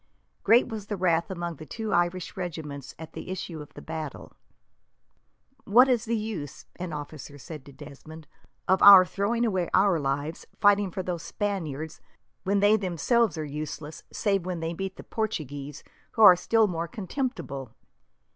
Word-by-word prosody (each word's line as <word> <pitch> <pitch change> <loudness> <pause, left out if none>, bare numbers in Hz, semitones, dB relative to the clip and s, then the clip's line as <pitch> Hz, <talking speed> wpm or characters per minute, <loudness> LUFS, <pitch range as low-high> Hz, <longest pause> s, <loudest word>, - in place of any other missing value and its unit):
Great 230 +4 +5
was 220 -4 -6
the 205 - -3
wrath 170 -1 +1
among 175 -3 -4
the 155 - -10
two 220 -2 -4
Irish 175 +2 0
regiments 155 -7 -6
at 160 0 -10
the - - -8
issue 175 -4 -5
of 150 - -11
the - - -10
battle. 155 -3 -6 1.3
"What 245 +6 +6
is 245 -3 +1
the 230 0 0
use," 205 -10 -5
an 180 -1 -5
officer 145 -1 -7
said 150 0 -9
to 140 - -12
Desmond, 150 +3 -12 0.4
"of 190 +1 +3
our 195 -2 +10
throwing 210 +6 0
away 185 -6 0
our 190 -3 +4
lives, 145 +3 -3
fighting 205 -1 +4
for 185 +1 -4
these 175 -2 -3
Spaniards, 160 -7 -4 0.4
when 200 +1 +1
they 205 +2 +5
themselves 195 - +1
are 155 - -3
useless, 150 +1 -6
save 195 -3 0
when 180 -1 -4
they 165 +1 -3
meet 190 +2 -5
the - - -10
Portuguese, 145 - -4 0.3
who 225 - +3
are 185 -4 +11
still 220 +5 +3
more 170 -4 -2
contemptible? 190 - -5
175 Hz, 165 wpm, -27 LUFS, 155-205 Hz, 1.3 s, are